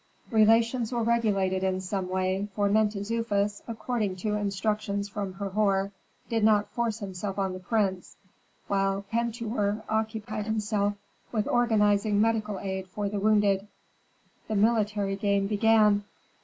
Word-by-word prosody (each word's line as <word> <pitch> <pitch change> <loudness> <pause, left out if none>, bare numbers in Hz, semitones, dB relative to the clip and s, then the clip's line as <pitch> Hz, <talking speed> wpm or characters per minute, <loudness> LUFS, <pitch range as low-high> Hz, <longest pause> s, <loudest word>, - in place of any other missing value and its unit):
Relations 225 +2 +3
were 240 -2 0
regulated 200 -5 +1
in 190 -1 0
some 190 0 -3
way, 185 +2 0
for 205 -1 +2
Mentezufis, 210 0 0
according 225 -4 -2
to 210 +3 -2
instructions 205 0 -1
from 200 -1 -4
Herhor, 195 0 0 0.4
did 225 -2 0
not 210 -1 +4
force 235 -3 -1
himself 195 -1 -5
on 190 -2 -1
the 185 - -6
prince, 190 -2 -1 0.5
while 195 0 0
Pentuer 225 -2 -1
occupied 220 -1 -2
himself 210 -1 0 0.4
with 215 -3 -1
organizing 210 -3 +2
medical 215 -2 +1
aid 190 -1 -4
for 200 +2 -3
the 205 0 -2
wounded. 205 -1 +2 0.8
The 220 - -2
military 210 -2 +2
game 200 -1 +1
began. 210 0 +4
205 Hz, 130 wpm, -27 LUFS, 195-220 Hz, 0.8 s, not